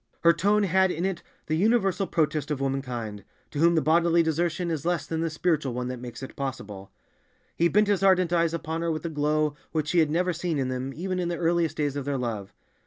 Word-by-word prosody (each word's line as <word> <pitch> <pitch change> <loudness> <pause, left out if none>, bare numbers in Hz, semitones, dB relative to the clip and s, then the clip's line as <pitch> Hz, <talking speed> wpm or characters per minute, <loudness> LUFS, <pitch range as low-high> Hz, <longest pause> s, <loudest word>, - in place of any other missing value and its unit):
Her 170 0 +6
tone 205 +5 +2
had 190 0 +3
in 175 +1 -2
it 190 -3 -2 0.2
the 155 - -2
universal 195 0 +2
protest 155 -2 0
of 150 -3 -1
womankind, 125 -7 -3 0.3
to 145 - -4
whom 170 +2 +5
the 160 - +2
bodily 170 +1 +4
desertion 170 +2 -1
is 155 -3 -2
less 175 0 0
than 160 0 -3
the 165 - 0
spiritual 155 -5 0
one 125 0 -3
that 125 -1 -5
makes 125 +2 -8
it 130 - -8
possible. 105 -8 -6 0.6
He 170 - +3
bent 210 +4 +3
his 205 -2 +1
ardent 185 -3 +4
eyes 170 -1 +3
upon 160 0 -3
her 170 0 0
with 155 +1 -4
a - - -1
glow 150 0 +1 0.2
which 155 -2 -1
she 175 - +3
had 155 -2 +3
never 180 +3 +1
seen 170 -1 -2
in 130 -2 -1
them 130 +1 -3
even 185 +2 -3
in 175 - -1
the 170 0 -2
earliest 170 -1 +1
days 145 -2 -1
of 140 -2 -3
their 140 -1 -1
love. 110 -6 -4
160 Hz, 235 wpm, -26 LUFS, 140-175 Hz, 0.6 s, Her